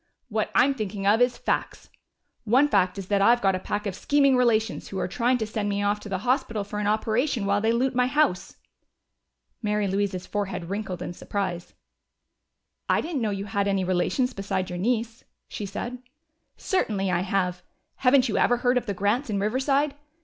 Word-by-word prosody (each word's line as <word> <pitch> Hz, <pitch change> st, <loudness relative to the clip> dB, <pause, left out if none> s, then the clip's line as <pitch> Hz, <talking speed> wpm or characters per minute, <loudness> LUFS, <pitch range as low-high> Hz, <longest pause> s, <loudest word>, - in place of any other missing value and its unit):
"What 215 Hz, -1 st, -1 dB
I'm 275 Hz, +2 st, +5 dB
thinking 205 Hz, -5 st, -4 dB
of 210 Hz, +4 st, +4 dB
is 245 Hz, -1 st, +3 dB
facts. -, -, -3 dB, 0.5 s
One 250 Hz, +6 st, +4 dB
fact 195 Hz, -6 st, +2 dB
is 195 Hz, -, -5 dB
that 200 Hz, -1 st, +2 dB
I've 235 Hz, +4 st, +5 dB
got 195 Hz, -1 st, +4 dB
a 185 Hz, -, -1 dB
pack 205 Hz, +2 st, -3 dB
of 200 Hz, -, -2 dB
scheming 275 Hz, +5 st, +3 dB
relations 230 Hz, -3 st, +1 dB
who 195 Hz, -, -6 dB
are 185 Hz, -, -1 dB
trying 245 Hz, +5 st, +1 dB
to 220 Hz, -, -2 dB
send 215 Hz, -1 st, -3 dB
me 200 Hz, 0 st, -1 dB
off 205 Hz, +1 st, +1 dB
to 205 Hz, -, -9 dB
the 190 Hz, -, -1 dB
hospital 250 Hz, -4 st, 0 dB
for 210 Hz, +1 st, -5 dB
an 210 Hz, -, -1 dB
operation 220 Hz, +2 st, 0 dB
while 200 Hz, +1 st, +1 dB
they 220 Hz, +1 st, +2 dB
loot 255 Hz, +3 st, +1 dB
my 250 Hz, 0 st, +2 dB
house." 285 Hz, -9 st, +1 dB, 1.1 s
Mary 210 Hz, -2 st, 0 dB
Louise's 190 Hz, -1 st, -1 dB
forehead 195 Hz, -4 st, -4 dB
wrinkled 195 Hz, -4 st, -4 dB
in -, -, -5 dB
surprise. 185 Hz, -2 st, -4 dB, 1.1 s
"I -, -, +3 dB
didn't 315 Hz, -5 st, -3 dB
know 220 Hz, -, 0 dB
you 200 Hz, -1 st, -3 dB
had 200 Hz, 0 st, -1 dB
any 195 Hz, -1 st, +1 dB
relations 185 Hz, +8 st, 0 dB
besides 190 Hz, -2 st, -3 dB
your 175 Hz, -, -4 dB
niece," 230 Hz, +2 st, -1 dB, 0.2 s
she 205 Hz, -, -5 dB
said. 240 Hz, +5 st, -5 dB, 0.6 s
"Certainly 205 Hz, -, 0 dB
I 175 Hz, -, +1 dB
have. 180 Hz, -1 st, -1 dB, 0.4 s
Haven't 255 Hz, 0 st, +4 dB
you 220 Hz, -, 0 dB
ever 245 Hz, -, +3 dB
heard 245 Hz, +1 st, +2 dB
of 245 Hz, -, -14 dB
the 200 Hz, -, -2 dB
Grants 210 Hz, +8 st, 0 dB
in 200 Hz, -2 st, 0 dB
Riverside? 270 Hz, +7 st, +1 dB
210 Hz, 195 wpm, -25 LUFS, 195-245 Hz, 1.1 s, I'm